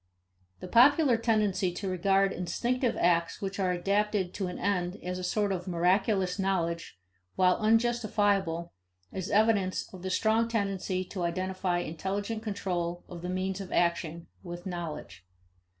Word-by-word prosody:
The - - -6
popular 265 - +5
tendency 215 -5 +1
to 195 +2 -4
regard 195 +1 +2
instinctive 240 +8 -1
acts 170 -1 +2
which 195 0 -4
are 185 -2 +2
adapted 200 +1 0
to 195 - -2
an 180 - -5
end 180 -1 -1
as 180 0 -3
a - - -5
sort 205 +2 0
of 180 -1 -3
miraculous 185 +2 +1
knowledge, 170 - -1 0.4
while 180 -1 +4
unjustifiable, 210 -6 +1 0.4
is 190 -1 -4
evidence 205 -3 +2
of 185 - -9
the 185 - -3
strong 220 +4 +2
tendency 195 -4 -1
to 185 0 -6
identify 185 +1 -1
intelligent 200 +7 -3
control 175 -5 -3
of 175 -2 -9
the 180 - -4
means 185 +1 -2
of 190 - -8
action 170 -1 0 0.2
with 175 -1 -8
knowledge. 155 - -6
190 Hz, 145 wpm, -29 LUFS, 175-205 Hz, 0.4 s, popular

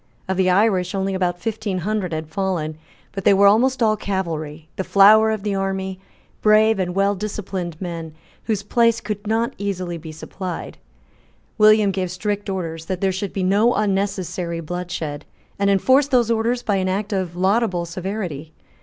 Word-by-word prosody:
Of 190 - -1
the 185 0 +2
Irish 185 -1 +2
only 195 0 -1
about 180 -2 -1
fifteen 215 -2 -3
hundred 190 0 -2
had 160 -1 -4
fallen; 160 -2 -2 0.4
but 195 - -5
they 200 - +5
were 200 +1 +5
almost 240 +5 +4
all 215 -1 +3
cavalry, 165 -7 -4
the 190 - -2
flower 215 +3 +6
of 215 -2 -2
the 205 -1 -1
army, 190 -1 -2 0.4
brave 215 0 +4
and 180 -1 -2
well 200 +1 +2
disciplined 190 -4 -5
men, 165 -3 -6 0.3
whose 210 -3 -1
place 230 +2 +2
could 210 0 -5
not 225 +2 0
easily 185 -4 -3
be 160 0 -9
supplied. 175 +3 -7 0.8
William 215 -1 +6
gave 185 -1 -2
strict 205 +3 -3
orders 165 -4 -4
that 185 +1 -3
there 195 0 +1
should 190 +1 -4
be 195 - -2
no 205 +6 +3
unnecessary 195 -4 -1
bloodshed, 165 -3 -5 0.4
and 200 0 +2
enforced 260 +8 +3
those 240 -4 +3
orders 230 +2 0
by 205 -2 +1
an 185 0 0
act 205 +2 -2
of 185 -3 -2
laudable 190 -1 +1
severity. 170 -4 -5
195 Hz, 170 wpm, -21 LUFS, 180-210 Hz, 0.8 s, flower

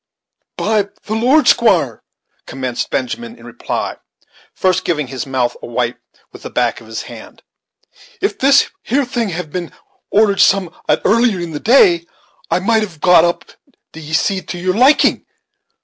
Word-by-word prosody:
"By 210 -2 0
the 215 - -5
Lord, 255 +6 +3
squire," 180 - +3 0.5
commenced 130 -2 -4
Benjamin, 230 - -4
in - - -15
reply, - - -4 0.5
first 185 -1 0
giving 150 -4 -1
his 130 0 -6
mouth 130 -2 -1
a - - -8
wipe 120 0 -2 0.3
with - - -13
the - - -7
back - - -1
of 110 - -15
his 110 0 -5
hand, - - -12 0.8
"if 400 - -2
this 275 +1 +4
here 270 +3 0
thing 240 -3 -2
had 170 -3 -5
been 175 -1 -5 0.4
ordered 205 -2 +2
sum'at 185 -4 +1
earlier 230 -2 +3
in 170 -1 -5
the 150 - -5
day, 175 - +4 0.4
it - - +2
might 225 +1 +2
have 180 -8 -6
been 180 +3 +2
got 170 -2 +7
up, 170 - -2 0.5
d'ye 160 -1 -9
see, 190 +4 +1
to 180 - -7
your 185 +1 -1
liking. 260 +6 +4
185 Hz, 165 wpm, -16 LUFS, 150-225 Hz, 0.8 s, got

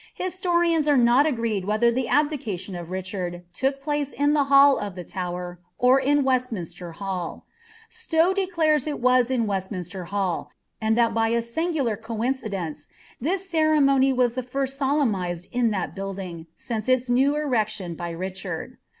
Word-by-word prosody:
Htsiorians 345 -4 +1
are 290 -2 +4
not 245 +4 +5
agreed 230 -8 -1
whether 215 +3 +3
tlie 250 0 -1
aUiiniioa 230 - -1
of 170 - -10
Richard 185 -1 -4
took 270 +5 -1
plac« 290 -1 -1
in 290 +1 +2
the 290 -2 +3
hall 275 0 +6
of 205 -3 -5
the 180 - -6
Tuwer. 180 -1 -5 0.2
or 255 +2 +5
in 285 +1 +2
Weslminrtrr 185 -10 -2
UsIL 185 -3 -4 0.4
Stow 375 -7 +1
declares 330 -7 +1
it 295 - -3
was 255 0 +3
in 250 -3 +1
Weslniineier 190 -2 -4
Hall, 195 -3 -2 0.3
and 220 +1 +1
that 235 -1 +3
by 225 0 +1
n 235 - +2
singuhff 245 - -1
eoii 230 +3 -1
cidence, 195 - -5 0.3
tbis 355 +8 0
ceremony 285 -4 +4
was 250 -2 +2
the 255 - -2
first 270 +2 -3
solemnised 215 - 0
in 245 -1 +2
tliat 195 -4 -3
batlilinf, 190 -4 -6 0.4
nu - - +3
its 255 0 -7
new 265 +4 +3
erection 220 - -1
by 170 +1 -5
Ricliard. 185 +5 -5
240 Hz, 160 wpm, -24 LUFS, 190-280 Hz, 0.4 s, hall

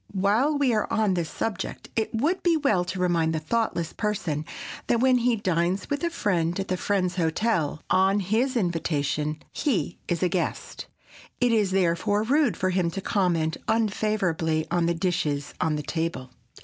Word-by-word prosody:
While 220 +10 +2
we 270 -4 +2
are 215 - 0
on 215 -3 +2
this 170 -3 -1
subject 225 -2 -4
it 220 -1 0
would 305 +12 0
be 340 -2 +3
well 215 - +2
to 185 +1 -4
remind 170 -3 +1
the - - 0
thoughtless 170 -1 -1
person 180 -8 -2 0.4
that 235 - +2
when 255 0 +4
he 240 0 +2
dines 185 0 -1
with 285 +3 -1
a 340 - +2
friend 180 - 0
at 195 - -3
that 185 - 0
friend's 185 -3 0
hotel, 165 -2 0
on 190 +2 +3
his 230 +7 +1
invitation, 155 -5 -1
he 225 - -1
is 175 +1 -1
a - - +4
guest. 175 0 -3 0.5
It 245 -1 +3
is 215 -4 +3
therefore 190 +3 +1
rude 255 - +2
for 185 0 0
him 180 -2 +1
to 185 +4 -5
comment 175 -5 0
unfavorably 195 -8 0
on 175 -1 +2
the 170 - +1
dishes 165 -5 -1
on 160 -1 +1
the 150 - -3
table. 155 -5 -3
185 Hz, 175 wpm, -26 LUFS, 165-220 Hz, 0.5 s, when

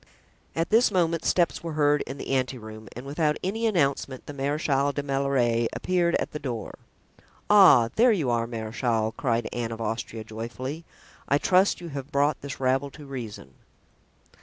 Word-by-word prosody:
At 165 +4 -1
this 230 +3 +5
moment 170 -4 +1
steps 175 -2 +2
were 165 -2 -4
heard 150 -1 +3
in - - -6
the - - -6
ante 130 -1 0
room 110 -2 -10
and 125 +3 -8
without 150 +2 0
any 225 +5 0
announcement 140 - 0
the 145 - -7
Marechal 140 0 0
de 145 0 -3
la - - -12
Meilleraie 130 -4 +1
appeared 175 -2 +1
at - - -1
the 150 - -5
door. 120 -7 -5 0.7
"Ah, 185 - +7
there 240 +2 +6
you 155 - +1
are, 115 -1 0
marechal," 110 -1 -1
cried 120 -4 0
Anne 120 -1 -3
of 115 - -6
Austria 115 0 -4
joyfully. 125 +8 -6 0.4
"I 140 - +3
trust 185 +4 +3
you 170 - -7
have 140 0 -7
brought 145 0 +1
this 140 -1 -7
rabble 135 +2 +1
to 150 +1 -12
reason." 115 - -7
140 Hz, 175 wpm, -26 LUFS, 120-160 Hz, 0.7 s, Ah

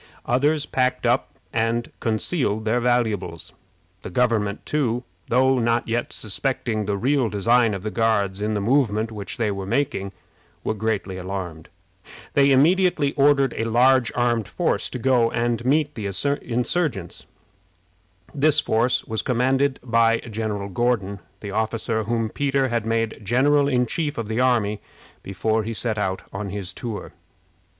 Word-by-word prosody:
Others 145 +5 +1
packed 130 -2 0
up - - +2 0.2
and 115 +1 0
concealed 110 -1 -1
their 115 +3 +2
valuables. 110 -9 -1 0.5
The - - -7
government, 110 -1 0
too, 125 -5 0 0.2
though 130 +1 +3
not 115 0 +1
yet 120 +1 -1
suspecting 110 0 -2
the 100 0 -1
real 130 +1 +1
design 110 +2 +2
of 95 - -7
the 110 - -3
Guards 105 -4 +1
in 105 +1 -1
the - - 0
movement 115 -2 +1
which 100 -3 -6
they 110 -3 0
were 100 -1 -5
making, 115 -6 -1 0.5
were - - 0
greatly 105 -3 -2
alarmed. 90 -4 -6 0.6
They 140 0 +4
immediately 155 +1 +3
ordered 140 -2 +3
a 110 - -2
large 125 +1 +4
armed 120 -3 +1
force - - -1
to - - -5
go 125 -2 +3
and 120 0 -1
meet 145 +3 +2
the 105 -3 -4 0.3
insurgents. 125 - -2 1.1
This 150 +1 +3
force 120 -1 +1
was 110 -1 -2
commanded 130 +2 +1
by 115 -1 +3
General 105 -3 -4
Gordon, 100 -2 0 0.2
the 100 - -6
officer 110 +1 -1
whom 115 -1 -1
Peter 135 -2 0
had 115 -2 -1
made 115 -1 -1
general 140 +7 +3
in 125 -3 +2
chief 150 +4 -3
of 115 -2 -3
the 110 +2 -1
army 115 -5 +2 0.4
before 110 +4 -1
he 115 +1 -4
set 110 -1 +2
out 95 -2 -2
on 100 +1 -4
his 95 -2 -5
tour. 110 0 -6
115 Hz, 150 wpm, -23 LUFS, 105-130 Hz, 1.1 s, They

